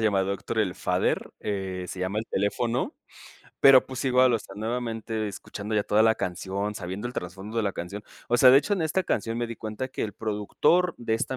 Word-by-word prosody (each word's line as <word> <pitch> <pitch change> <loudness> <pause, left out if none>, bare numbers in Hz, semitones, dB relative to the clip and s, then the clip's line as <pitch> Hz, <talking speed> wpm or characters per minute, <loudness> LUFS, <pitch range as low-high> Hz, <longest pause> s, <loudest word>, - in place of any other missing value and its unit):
llamada 100 -3 +2
Héctor 110 +3 -4
El 95 -3 0
Father, 90 -1 0
eh, 95 -3 -3
se 95 - -6
llama 95 +3 -1
El - - -8
teléfono, 115 +5 -1 0.7
pero, 135 -2 +8
pues, 130 +1 -6
igual, 130 -1 +4
o 115 - +2
sea, 95 - -12
nuevamente, 110 -1 -3
escuchando 105 +2 -6
ya 105 - +3
toda 105 +2 +3
la 110 0 +5
canción, 100 +3 -3
sabiendo 95 +5 -5
el 120 - -5
trasfondo 95 +6 -6
de 115 - +2
la 100 -2 0
canción. 100 +4 -6 0.3
O 120 - +3
sea, 130 +1 +8
de 135 - +8
hecho, 205 - -2
en 180 - -1
esta 160 +4 +1
canción 115 -7 -1
me 120 - -1
di 115 -1 -7
cuenta 110 +4 -5
que 130 - -4
el 105 - -3
productor 110 - +1
de 115 -2 -1
esta 130 +3 -2
110 Hz, 215 wpm, -26 LUFS, 100-120 Hz, 0.7 s, pero